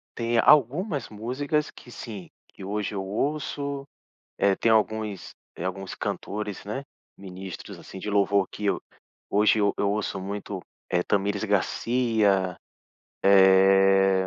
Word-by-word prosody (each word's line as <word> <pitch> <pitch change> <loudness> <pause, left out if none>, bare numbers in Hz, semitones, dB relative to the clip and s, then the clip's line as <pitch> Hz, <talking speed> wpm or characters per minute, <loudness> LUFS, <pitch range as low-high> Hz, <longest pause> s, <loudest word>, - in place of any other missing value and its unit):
tem 115 0 0
algumas 145 - +3
músicas 135 +8 -2
que 120 - -14
sim, 105 -7 -8 0.2
que - - -13
hoje 105 +1 -3
eu 95 - -2
ouço, 140 +4 -2 0.5
eh, 100 -1 +3
tem 115 - +2
alguns 110 -2 0 0.3
alguns 95 +2 -4
cantores, 105 -1 -4
né, 105 +7 -4 0.3
ministros 95 -1 -8
assim, 95 - -10
de 105 - -4
louvor 100 -1 +2
que 105 - -6
eu 100 - +1 0.5
hoje 105 +1 +4
eu 100 0 +2
eu 100 - +1
ouço 100 -1 -2
muito, 100 0 -5 0.3
é 90 - +2
Thamires 100 +2 0
Garcia, 105 -2 +1 0.7
eh, 95 0 +5
100 Hz, 125 wpm, -26 LUFS, 95-115 Hz, 0.7 s, eh